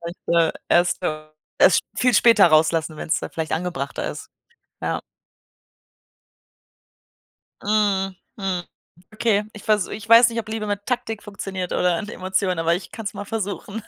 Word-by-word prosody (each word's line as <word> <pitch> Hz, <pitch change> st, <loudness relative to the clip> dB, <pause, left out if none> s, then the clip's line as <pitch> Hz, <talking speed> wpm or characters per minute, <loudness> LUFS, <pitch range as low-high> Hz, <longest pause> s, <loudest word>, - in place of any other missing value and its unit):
Und, 170 Hz, +1 st, -7 dB, 0.2 s
äh, 165 Hz, -1 st, +3 dB, 0.2 s
erst 175 Hz, 0 st, +3 dB
so -, -, 0 dB, 0.5 s
erst -, -, +6 dB, 0.2 s
sp -, -, -24 dB
viel 250 Hz, 0 st, +3 dB
später 230 Hz, -3 st, +6 dB
rauslassen, 160 Hz, 0 st, +2 dB
wenn's 160 Hz, -, -1 dB
dann -, -, -6 dB
vielleicht 160 Hz, -1 st, -4 dB
angebrachter 160 Hz, -5 st, -3 dB
ist. -, -, -9 dB, 0.5 s
Ja. -, -, -2 dB, 2.6 s
Mhm, 200 Hz, -2 st, +1 dB, 0.2 s
Mhm, 190 Hz, -4 st, -2 dB, 0.5 s
okay, 215 Hz, -2 st, +1 dB
ich 210 Hz, -, -11 dB
versu 210 Hz, -3 st, +1 dB
ich 220 Hz, +1 st, -7 dB
weiß 230 Hz, +1 st, +8 dB
nicht, 230 Hz, -, -4 dB
ob 215 Hz, -, -11 dB
Liebe 220 Hz, -1 st, -3 dB
mit 205 Hz, 0 st, -3 dB
Taktik 225 Hz, -4 st, -2 dB
funktioniert 195 Hz, -3 st, -5 dB
oder 180 Hz, -2 st, +1 dB
mit 210 Hz, -, -7 dB
Emotionen, 185 Hz, -1 st, -1 dB
aber 165 Hz, +1 st, +2 dB
ich 180 Hz, -, -6 dB
kann 225 Hz, -, -8 dB
es 200 Hz, -, -3 dB
mal 200 Hz, 0 st, -6 dB
versuchen. 210 Hz, 0 st, -4 dB
195 Hz, 160 wpm, -22 LUFS, 175-215 Hz, 2.6 s, weiß